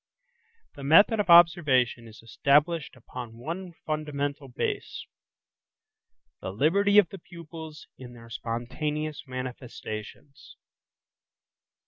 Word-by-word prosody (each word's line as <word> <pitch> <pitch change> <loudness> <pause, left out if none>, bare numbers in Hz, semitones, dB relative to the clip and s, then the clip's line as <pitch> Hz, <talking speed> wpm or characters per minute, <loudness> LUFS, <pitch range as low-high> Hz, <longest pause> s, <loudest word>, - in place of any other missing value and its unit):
The 140 - -10
method 200 +10 +5
of 205 - -1
observation 150 -9 +5
is 110 0 -14
established 145 +6 +1
upon 120 -2 -9
one 170 +8 -6
fundamental 145 -2 -3
base–the 125 - -4 1.5
liberty 195 - +3
of 200 -5 +6
the 195 - -9
pupils 165 -2 -11
in 125 -2 -10
their 115 -1 -14
spontaneous 150 +7 -4
manifestations. 130 0 -8
145 Hz, 90 wpm, -27 LUFS, 125-165 Hz, 1.5 s, of